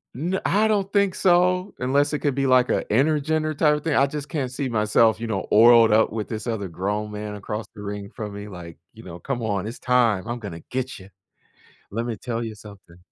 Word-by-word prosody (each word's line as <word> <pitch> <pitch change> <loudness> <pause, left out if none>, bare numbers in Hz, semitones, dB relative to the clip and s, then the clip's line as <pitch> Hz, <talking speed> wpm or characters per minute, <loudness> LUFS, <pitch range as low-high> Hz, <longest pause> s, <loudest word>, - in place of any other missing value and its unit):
N 175 +8 -2
I 215 +2 +3
don't 200 -2 0
think 200 -2 +2
so, 180 +1 +2
unless 140 +4 +1
it 150 - 0
could 145 -3 -1
be, 135 0 0
like, 130 -1 +4
a - - +1
intergender, 155 +4 +1
type 150 -1 +4
of 150 - -5
thing? 160 -3 0
I 140 - +4
just 150 0 -6
can't 140 -6 -3
see 130 0 -3
myself, 110 0 +3
you 115 - -4
know, 100 -4 -2
oiled 115 0 +7
up 110 +1 +4
with 110 -1 -4
this 110 0 -5
other 110 -4 -2
grown 105 +5 -3
man 105 0 -6
across 105 +1 -5
the 105 - -9
ring 100 0 -6
from 105 -3 -6
me, 100 +1 -7
like, 90 -4 -10 0.2
you 115 - -13
know, 85 -1 -9
"Come 125 +4 -4
on, 100 -3 -2
it's 115 - -7
time, 115 -6 +2
I'm 120 0 -4
gonna 85 -7 -8
get 130 0 -3
ya. 95 - -13 0.8
Let 115 +3 -2
me 120 -2 -3
tell 120 -1 -4
you 110 -1 -6
something." 100 -5 -15
115 Hz, 230 wpm, -23 LUFS, 105-145 Hz, 0.8 s, oiled